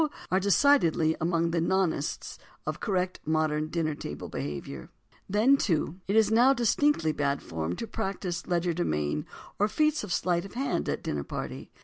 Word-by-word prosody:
—are 185 - +4
decidedly 190 - +3
among 165 0 +1
the 165 -1 +1
"non 190 0 +2
ests" 145 - -5 0.3
of - - -3
correct 185 -3 -1
modern 155 -1 0
dinner 160 -1 -1
table 75 - -7
behaviour. 70 -2 -6 0.4
Then, 225 +8 +4
too, 165 - 0
it 200 - 0
is 220 -1 +4
now 245 +5 +5
distinctly 240 - +2
bad 140 -2 -1
form 80 +1 -3
to - - -4
practise 195 -5 -4
legerdemain 170 - 0 0.3
or 205 - +4
feats 305 +5 +1
of 205 - -6
sleight 175 0 +1
of 195 - -11
hand 270 +3 -1
at - - -1
a - - -25
dinner - - -2
party. - - -6
175 Hz, 165 wpm, -28 LUFS, 155-210 Hz, 0.4 s, now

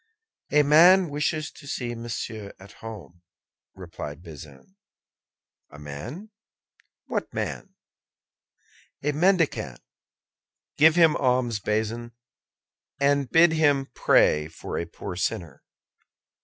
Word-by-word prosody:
"A 150 0 +5
man 170 +5 +6
wishes 150 +1 -2
to 140 - -15
see 120 -3 -4
Monsieur 115 -3 -6
at 95 +1 -14
home," 105 -6 -10 0.5
replied 75 +4 -8
Bazin. 75 - -13 0.9
"A 75 - -14
man! 115 - -8 0.7
What - - -3
man?" - - -5 1.3
"A 150 - +1
mendicant." 170 +1 +1 1.0
"Give 155 +2 +5
him 165 -3 +5
alms, 125 -4 +1
Bazin, 110 +3 -3 0.9
and 140 -2 +2
bid 165 +1 +5
him 145 -4 +1
pray 75 0 +3
for 80 - -6
a 85 - -3
poor 90 +2 -8
sinner." 90 -5 -3
125 Hz, 100 wpm, -25 LUFS, 100-155 Hz, 1.3 s, man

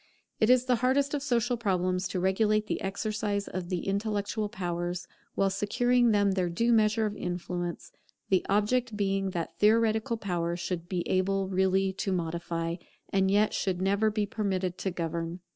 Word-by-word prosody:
It 220 - +3
is 250 0 +5
the 250 -2 +2
hardest 270 +4 +1
of 290 - -1
social 245 -3 +1
problems 185 -3 0
to 185 - -3
regulate 210 +3 +2
the - - -3
exercise 205 +1 -2
of 180 -1 -5
the 180 -2 -2
intellectual 205 +1 -1
powers, 175 -1 -3 0.3
while 195 -1 +2
securing 245 +5 +2
them 205 -2 +3
their 185 -2 0
due 230 +8 +2
measure 220 0 +3
of 210 -1 -2
influence; 175 -2 -4 0.4
the 190 -2 +3
object 215 +3 +1
being 195 -1 0
that 170 -3 -5
theoretical 220 +2 +3
power 175 -5 -2
should 175 0 -4
be 180 -2 -2
able 190 +1 +1
really 190 0 +2
to 195 +1 -2
modify, 170 -1 -2 0.3
and 190 -1 +2
yet 205 +2 +3
should 185 -2 -1
never 200 +3 +2
be 210 -1 0
permitted 195 -4 -2
to 195 - -1
govern. 170 0 -3
195 Hz, 165 wpm, -29 LUFS, 180-215 Hz, 0.4 s, is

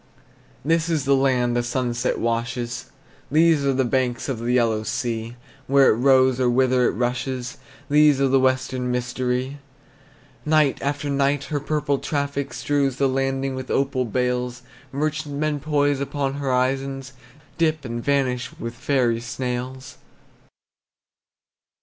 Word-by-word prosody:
This 165 +1 +2
is 155 -5 0
the 140 0 +4
land 125 -3 +2
the 120 - +2
sunset 120 0 -1
washes, 115 +1 -2 0.4
These 155 0 +4
are 140 -1 +2
the 130 0 +1
banks 125 -1 0
of 125 -4 -2
the 120 +2 -1
Yellow 115 -3 +2
Sea; 115 0 -3 0.3
Where 135 0 +5
it - - +2
rose, 130 0 +4
or 125 -1 +3
whither 125 0 +3
it - - 0
rushes, 125 +2 -2 0.3
These 150 -1 +5
are 140 - +3
the 135 0 +3
western 130 -1 0
mystery! 125 +2 -2 0.8
Night 155 -3 +3
after 145 +1 -2
night 140 0 +1
her 145 - +1
purple 145 -1 -1
traffic 140 -2 -2
Strews 140 -3 0
the 140 +1 +2
landing 135 0 -1
with 130 0 -6
opal 135 -2 0
bales; 125 +1 -2 0.3
Merchantmen 150 0 -2
poise 145 -1 +1
upon 140 -1 -2
horizons, 135 0 -1 0.5
Dip, 155 -3 +1
and 120 -1 -4
vanish 135 -2 0
with 115 -6 -5
fairy 120 -2 +1
sails. 125 +3 -5
130 Hz, 135 wpm, -23 LUFS, 125-140 Hz, 0.8 s, Where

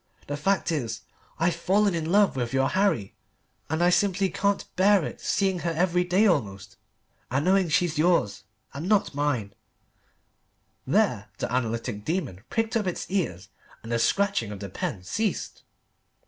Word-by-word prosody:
The 145 - -4
fact 185 +4 0
is 140 -8 -3 0.4
I've 170 +2 +2
fallen 195 +3 +2
in 165 -1 -2
love 205 -3 +4
with 120 -2 -2
your 135 0 +2
Harry, 185 - +1 0.6
and 160 +3 0
I 175 - +5
simply 195 0 +2
can't 200 0 0
bear 195 -2 +4
it - - -7
seeing 190 -2 0
her 170 - -2
every 180 +2 +1
day 180 +4 +3
almost 100 - 0 0.5
and 135 +5 0
knowing 190 -1 +3
she's 160 0 +1
yours 155 - +2 0.3
and 155 +7 -5
not 210 -6 +2
mine" 135 -8 -1 1.3
(there - - +1
the - - -3
analytic 115 -3 -2
demon 145 - -3
pricked 225 +1 -1
up 215 -4 +1
its 180 - -4
ears 100 - -2 0.3
and 115 - -7
the 115 - +1
scratching 190 - +1
of 100 - -7
the 100 -1 -6
pen 115 - -4
ceased). 210 - -2
170 Hz, 160 wpm, -26 LUFS, 120-190 Hz, 1.3 s, I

